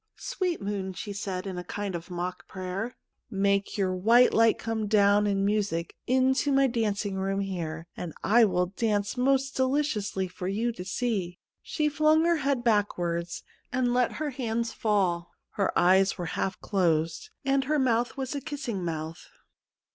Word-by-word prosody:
' - - -57 0.2
Sweet 365 -3 -1
moon,' 195 -2 -3
she 205 +3 -6
said 195 -2 -4
in 185 -2 -4
a - - -5
kind 200 +2 -4
of 170 0 -6
mock 180 +1 -4
prayer, 190 +6 -4 0.2
' - - -53 0.2
make 200 +2 0
your 190 -2 +1
white 230 +7 +5
light 225 0 +4
come 225 -2 -2
down 205 0 +4
in 195 -1 +1
music 200 -5 -1
into 260 +2 +2
my 275 0 +4
dancing 210 -5 -1
room 195 +1 -1
here, 165 -5 -4
and 175 - -5
I 230 +3 +6
will 180 -3 +1
dance 205 +2 -1
most 270 +1 +2
deliciously 260 -8 0
for 180 0 -6
you 220 +5 0
to 200 -6 -7
see.' 190 -4 -2 0.2
She 305 -2 -1
flung 310 +2 +3
her 340 -1 +3
head 275 -4 0
backward 175 -6 +1 0.4
and 250 -1 +1
let 250 -1 +2
her 300 -1 -3
hands 235 -2 -2
fall; 185 -6 0 0.2
her 200 -2 0
eyes 190 +2 +4
were 175 - -3
half 190 -1 -2
closed, 165 -5 0 0.2
and 270 0 +2
her 305 +3 +1
mouth 240 -2 +1
was 265 0 -3
a 285 - -3
kissing 275 - -4
mouth. 160 -1 -5
205 Hz, 170 wpm, -28 LUFS, 185-250 Hz, 0.4 s, I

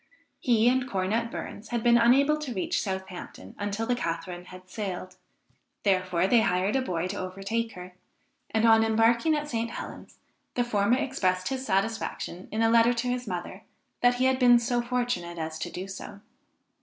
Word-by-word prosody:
He 235 -3 +3
and 255 +1 +2
Cornet 210 +3 0
Burns 215 -1 -7
had 235 -2 -2
been 235 0 +5
unable 275 +6 +4
to 270 -6 -5
reach 185 - 0
Southampton 190 - -6
until 205 +2 -2
the 245 - +1
Catharine 175 -4 -4
had 185 0 -12
sailed, 185 -2 -5 0.7
therefore 185 -3 +2
they 230 +3 +5
hired 185 +2 +1
a 265 - +2
boy 175 -8 -2
to 200 - -4
overtake 195 +5 -3
her, 180 0 -10 0.6
and 220 +1 +1
on 225 -1 +6
embarking 230 +7 +3
at 295 0 -2
St. 230 -4 -2
Helens - - -8 0.4
the 245 - +2
former 220 0 +2
expressed 185 -9 0
his 265 -1 -3
satisfaction, 195 -3 -2
in 220 +1 0
a 225 - +4
letter 230 +1 +5
to 240 +1 -1
his 250 -1 -2
mother, 180 -3 -5 0.4
that 245 0 +4
he 255 +1 +1
had 260 0 +2
been 245 -1 +7
so 240 +1 0
fortunate 240 -8 -2
as 160 0 -4
to 175 - -4
do 185 +2 -6
so. 200 +1 -9
220 Hz, 180 wpm, -27 LUFS, 185-245 Hz, 0.7 s, been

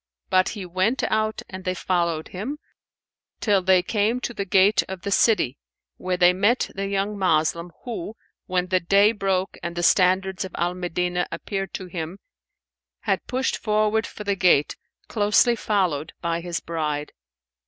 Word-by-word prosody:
But 185 0 +4
he 195 - -5
went 185 +8 0
out 215 0 0
and 185 0 -8
they 185 0 -1
followed 170 -3 -1
him, 225 +11 -5 0.8
till 205 -3 +2
they 185 -1 +4
came 215 +5 0
to 240 - -3
the 200 -3 -3
gate 195 +2 +4
of 190 -1 -6
the 200 - -3
city, 195 - +2 0.4
where 185 0 -2
they 180 0 +5
met 205 +7 +1
the 195 0 -3
young 200 +1 -2
Moslem 170 -1 +1
who, 220 -3 -5 0.3
when 180 -1 0
the 185 0 +3
day 200 +4 +4
broke 195 -3 -1
and 170 0 -5
the 175 - -2
standards 185 +1 +3
of 190 - -8
Al 175 +1 0
Medinah 180 0 -2
appeared 195 +3 -4
to 185 - -5
him, 170 0 -6 0.8
had - - -1
pushed 260 +1 0
forward 215 +1 +1
for 210 - -9
the 200 -1 0
gate 175 -6 +3 0.3
closely 210 +2 +3
followed 180 -9 -1
by 170 0 -2
his 175 -1 -4
bride. 150 -3 -3
185 Hz, 165 wpm, -24 LUFS, 175-205 Hz, 0.8 s, they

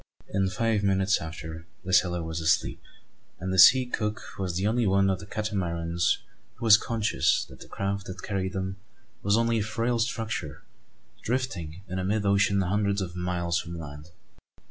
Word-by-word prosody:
In 95 -1 +2
five 110 +1 +1
minutes 95 -1 +2
after, 80 +1 -7 0.2
the 95 - -3
sailor 90 -3 +3
was 80 0 -4
asleep; 80 -1 +1 0.6
and 95 +1 -3
the 95 - +2
sea 130 +5 +9
cook 105 -3 -2 0.2
was 90 -3 -2
the 95 +3 0
only 115 +1 +2
one 95 0 +3
of 95 - -2
the 100 - -10
Catamarans 85 -5 -1 0.4
who - - -6
was 110 -2 +9
conscious 110 - +1
that 65 - -13
the - - -11
craft 100 0 -3
that 95 - -8
carried 95 -2 -2
them 95 0 -3 0.4
was 100 +2 +3
only 115 -1 +2
a - - 0
frail 115 +3 -1
structure 115 - -3 0.6
drifting 95 -9 -3
in 95 0 -3
mid 105 0 0
ocean 100 0 +3
hundreds 100 +2 +1
of 90 -3 -4
miles 90 -1 -1
from 85 0 -6
land. 75 0 -9
95 Hz, 170 wpm, -27 LUFS, 85-105 Hz, 0.6 s, sea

